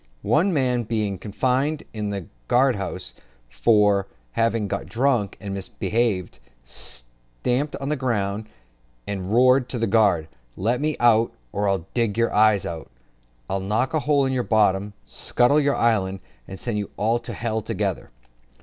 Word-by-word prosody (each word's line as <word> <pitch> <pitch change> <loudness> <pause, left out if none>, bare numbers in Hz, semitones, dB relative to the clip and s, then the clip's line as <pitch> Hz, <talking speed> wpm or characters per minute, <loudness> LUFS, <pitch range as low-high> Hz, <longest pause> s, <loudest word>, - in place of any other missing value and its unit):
One 150 - +3
man 130 -6 +1
being 105 -4 -2
confined 130 +9 0
in 105 -2 -3
the 100 -3 -4 0.2
guardhouse 115 - +1 0.3
for 100 - +3 0.2
having 115 - +1
got 100 0 -3
drunk 120 -5 +1
and 100 -2 -5
misbehaved, 100 0 -1 0.2
stamped - - -4
on 135 0 -4
the 150 - +1
ground, 110 -5 -2 0.6
and 95 -1 -4
roared 125 +2 +4
to 125 - -3
the 115 - +1
guard, 100 -7 +3 0.3
"Let 120 +7 0
me 155 0 0
out, 115 -1 +4 0.2
or, 95 -4 0
d 120 -2 +2
nour 115 0 +1
eyes, 105 -2 +4
I'll 80 -2 -6 0.7
knock 105 +8 0
a 155 - +2
hole 145 -1 +2
in 130 - 0
your 130 - +1
bottom, 105 -3 +2
scuttle 125 +5 +2
your 140 -1 +2
island, 95 -5 +1 0.3
and 95 - -8
send 110 -1 -2
you 100 - -4
all 115 +3 +1
to 120 - -8 0.2
h - - -9
together." - - -2
110 Hz, 150 wpm, -23 LUFS, 100-125 Hz, 0.7 s, roared